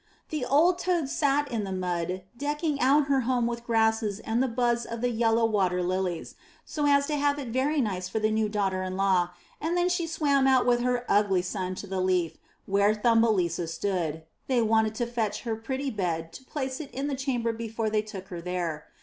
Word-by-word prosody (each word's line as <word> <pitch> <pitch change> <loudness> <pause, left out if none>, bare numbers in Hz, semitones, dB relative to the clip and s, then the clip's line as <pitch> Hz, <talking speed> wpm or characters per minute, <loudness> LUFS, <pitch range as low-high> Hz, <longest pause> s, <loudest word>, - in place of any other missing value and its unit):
The 305 -4 -2
old 320 +8 +3
toad 345 -6 0
sat 285 0 +1
in 225 -3 -1
the 195 - -4
mud 180 0 -2
decking 295 +2 -1
out 280 +3 +4
her 275 -1 +2
home 245 -1 +1
with 235 0 -4
grasses 220 -2 +1
and 225 +2 0
the 265 - +2
buds 240 0 +1
of 230 0 -6
the 245 0 +1
yellow 225 0 +2
water 185 -5 +1
lilies, 180 -1 -2 0.3
so 295 -2 -1
as 280 0 +4
to 295 0 -1
have 285 0 +2
it 270 -4 -5
very 270 +6 +1
nice 185 -5 -2
for - - -3
the 215 0 +1
new 215 -1 +1
daughter 195 -3 0
in 185 0 -4
law, 190 -3 +2 0.3
and 335 +3 0
then 355 +1 +2
she 350 -2 0
swam 285 -4 +2
out 260 -1 +4
with 245 -1 +3
her 245 0 0
ugly 200 -3 +3
son 185 0 -3
to 200 - -7
the 190 -1 -2
leaf 180 -3 0 0.3
where 200 +2 +3
Thumbelisa 210 -7 +2
stood; 165 -2 -2 0.2
they 250 -3 +2
wanted 220 0 +2
to 240 - -1
fetch 235 -3 -2
her 230 -3 -2
pretty 265 +5 -3
bed 165 -6 -2
to - - -10
place 265 -2 -4
it 300 -4 -7
in 270 +2 -4
the 290 - -1
chamber 255 -4 -1
before 225 -1 -3
they 215 0 +2
took 205 -3 -9
her 175 -2 -6
there. 170 -3 -3
225 Hz, 210 wpm, -27 LUFS, 190-265 Hz, 0.3 s, out